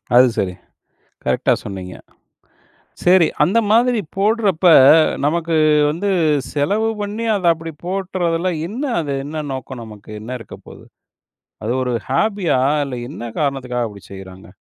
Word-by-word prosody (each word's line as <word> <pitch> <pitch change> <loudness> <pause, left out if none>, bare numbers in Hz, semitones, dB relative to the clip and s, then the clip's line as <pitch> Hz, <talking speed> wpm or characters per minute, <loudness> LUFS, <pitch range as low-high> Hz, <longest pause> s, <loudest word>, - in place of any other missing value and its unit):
அது 125 +1 +7
சரி. 90 -2 -1 0.7
கரெக்ட்டா - - +1
சொன்னீங்க. 95 -3 -7 1.1
சரி, 180 -2 +5 0.2
அந்த 190 +9 +2
மாதிரி 240 0 +3 0.2
போடுறப்ப, 200 -4 +2 0.6
நமக்கு 165 +2 0 0.4
வந்து 195 +6 -2 0.4
செலவு 205 +10 0
பண்ணி 210 +3 -4
அத 185 -3 -3
அப்டி 165 0 -8
போட்றதில்ல 185 -2 -1 0.2
என்ன 240 +9 -5 0.2
அது? 145 -2 -3
என்ன 155 +1 -5
நோக்கம் 130 -2 -7
நமக்கு 105 -2 -12
என்ன 125 +3 -5
இருக்கப்போது? - - -13 0.8
அது 115 - -1
ஒரு 125 -1 -2 0.2
ஹாபியா 180 -1 +1 0.3
இல்ல 130 -2 -5
என்ன 150 - -8 0.2
காரணத்துக்காக 130 -4 -1
அப்டி 100 -2 -13
செய்றாங்க? 95 -1 -11
160 Hz, 125 wpm, -19 LUFS, 125-195 Hz, 1.1 s, அது